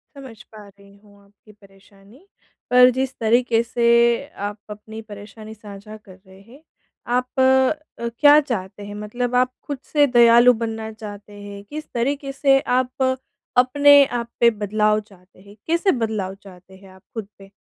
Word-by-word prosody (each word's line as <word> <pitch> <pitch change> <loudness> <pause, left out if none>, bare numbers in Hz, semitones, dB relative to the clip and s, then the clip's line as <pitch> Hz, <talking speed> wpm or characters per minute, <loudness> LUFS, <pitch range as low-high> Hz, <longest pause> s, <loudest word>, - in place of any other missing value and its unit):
समझ 255 -6 -12
पा 210 -2 -13
रही 200 0 -20
हूँ 205 0 -23
आपकी 205 +1 -22
परेशानी। 200 - -22 0.4
पर 250 0 +7
जिस 260 +1 -3
तरीके 230 0 +2
से 235 0 -3 0.6
आप 210 - -10
अपनी 220 +1 -9
परेशानी 215 +1 -12
साझा 210 0 -12
कर 195 -3 -17
रहे 190 0 -17
हैं, 255 +8 -18 0.4
आप 250 +2 -2
अ, 265 0 +1
क्या 290 0 +7
चाहते 205 -8 -6
हैं? 205 - -9
मतलब 240 +4 -4
आप 255 0 +2
खुद 285 -3 -6
से 290 -1 +4
दयालु 240 0 +6
बनना 220 -1 -4
चाहते 210 -1 -11
हैं, 200 0 -10
किस 305 +8 -8
तरीके 275 +3 -2
से 275 -1 +3
आप 255 +1 -2 0.5
अपने 285 +3 +6
आप 235 -2 -4
पे 235 - +6
बदलाव 215 0 0
चाहते 190 -3 -22
हैं? 200 +2 -17
कैसे 340 +4 +1
बदलाव 215 -6 -3
चाहते 190 -1 -16
हैं 190 0 -17
आप 190 0 -19
खुद 220 -3 -6
पे? 195 0 -16
220 Hz, 160 wpm, -21 LUFS, 205-255 Hz, 0.6 s, पर